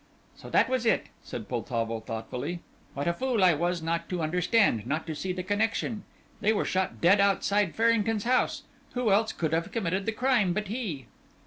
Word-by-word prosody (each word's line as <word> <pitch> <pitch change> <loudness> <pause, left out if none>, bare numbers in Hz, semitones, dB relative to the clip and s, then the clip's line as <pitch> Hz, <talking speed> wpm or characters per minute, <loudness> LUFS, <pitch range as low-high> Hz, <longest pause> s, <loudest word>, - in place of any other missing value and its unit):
"So - - -11
that - - +4
was 255 -2 0
it," - - +2
said 110 - -7
Poltavo, 115 -2 -2
thoughtfully. 125 +9 -5 0.3
"What 140 +2 -2
a 170 - +2
fool 245 +1 0
I 180 -2 +6
was 170 +2 -1
not 165 +1 -2
to 180 -3 -2
understand, 180 - +2
not 155 +4 -1
to 160 - -4
see 185 +5 -3
the 180 0 -4
connection. 210 +2 -1 0.3
They 215 - +2
were 210 - 0
shot 185 0 -1
dead 185 +4 +5
outside 200 -1 +2
Farrington's 225 -2 +2
house. 255 +2 +1 0.3
Who 245 -4 +1
else 220 +3 +3
could 160 -2 -2
have 165 +1 0
committed 195 -2 -1
the - - +2
crime 225 -5 +2
but 210 +1 -3
he?" 200 - -4
185 Hz, 190 wpm, -28 LUFS, 165-220 Hz, 0.3 s, I